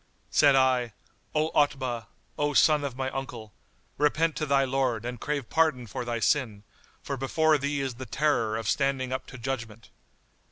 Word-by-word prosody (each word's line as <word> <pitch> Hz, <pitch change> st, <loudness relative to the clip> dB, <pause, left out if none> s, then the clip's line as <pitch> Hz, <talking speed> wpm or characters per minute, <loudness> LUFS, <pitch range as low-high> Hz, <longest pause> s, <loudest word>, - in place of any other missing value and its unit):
Said 140 Hz, -2 st, +5 dB
I, 130 Hz, -3 st, +2 dB, 0.4 s
"O 155 Hz, +1 st, +1 dB
Otbah, 130 Hz, -6 st, 0 dB, 0.3 s
O 145 Hz, 0 st, 0 dB
son 150 Hz, 0 st, +5 dB
of 140 Hz, -3 st, -4 dB
my 130 Hz, 0 st, -2 dB
uncle, 120 Hz, -5 st, -6 dB, 0.5 s
repent 155 Hz, +2 st, +2 dB
to 155 Hz, -, -2 dB
thy 140 Hz, -1 st, +3 dB
Lord 130 Hz, -4 st, 0 dB
and 125 Hz, -1 st, -5 dB
drave 145 Hz, -2 st, -3 dB
pardon 155 Hz, -7 st, +2 dB
for 110 Hz, -, -5 dB
thy 120 Hz, -1 st, -2 dB
sin; 110 Hz, -6 st, 0 dB, 0.4 s
for 140 Hz, -, -4 dB
before 155 Hz, +3 st, +2 dB
thee 140 Hz, +1 st, -1 dB
is 135 Hz, -2 st, -2 dB
the 130 Hz, +2 st, -8 dB
terror 115 Hz, -4 st, +1 dB
of 110 Hz, -2 st, -4 dB
standing 135 Hz, -1 st, 0 dB
up 130 Hz, 0 st, -4 dB
to 130 Hz, -, -10 dB
Judgment." 115 Hz, -3 st, -5 dB
135 Hz, 170 wpm, -27 LUFS, 120-145 Hz, 0.5 s, Said